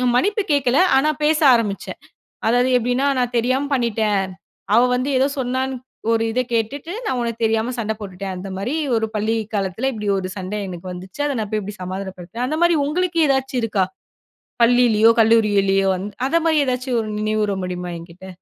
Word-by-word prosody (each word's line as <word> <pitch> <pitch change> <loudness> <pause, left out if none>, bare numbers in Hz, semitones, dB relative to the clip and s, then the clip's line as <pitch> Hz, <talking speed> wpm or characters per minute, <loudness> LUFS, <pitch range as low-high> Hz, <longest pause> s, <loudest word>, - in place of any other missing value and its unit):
மன்னிப்பு 410 - +2
கேட்கல, 270 -2 +2 0.2
ஆனா 300 +3 +3
பேச 305 0 +3 0.2
ஆரம்பிச்சேன். 210 -4 -3 0.5
அதாவது 245 +2 +3
எப்டின்னா 245 +3 0
நான் 245 -1 -1
தெரியாம 255 +4 0
பண்ணிட்டேன். 215 -5 +1 0.5
அவ 235 - +7
வந்து 255 +3 -1
ஏதோ 265 - +3
சொன்னானு, 260 +1 -1 0.4
ஒரு 225 0 +2
இத 250 - +1
கேட்டுட்டு 265 +9 -2
நான் 260 - -1
உனக்கு 235 -1 -3
தெரியாம 225 +2 +1
சண்ட 220 -1 -1
போட்டுடேன் 190 -1 -6
அந்த 190 +2 -7
மாரி, 245 +10 -2 0.2
ஒரு 220 - 0
பள்ளி 220 +2 0 0.2
காலத்துல 200 +6 -1
இப்டி 210 -3 -4
ஒரு 185 -1 -4
சண்ட 190 +2 -5
எனக்கு 180 0 -7
வந்துச்சு, 185 +7 -10
அத 280 -3 -1
நான் 210 -2 -4
போயி 215 -1 0
இப்டி 205 +1 -7
சமாதானப்படுத்துவேன், 190 +4 -5
அந்தமாரி 335 +4 +2
உங்களுக்கு 345 +2 -1
ஏதாச்சும் 265 -1 0
இருக்கா? 205 -4 +1 0.8
பள்ளியிலையோ, 230 -2 +5
கல்லூரியிலயோ 205 -4 +3
வந் 185 +2 -4 0.2
அந்த 330 +5 +2
மாரி 315 -2 +3
எதாச்சும் 250 -1 -1
ஒரு 215 - -6
நினைவூர 215 -1 0
முடியுமா 180 -1 -4
என்கிட்ட? 170 +2 -12
225 Hz, 165 wpm, -21 LUFS, 200-260 Hz, 0.8 s, அவ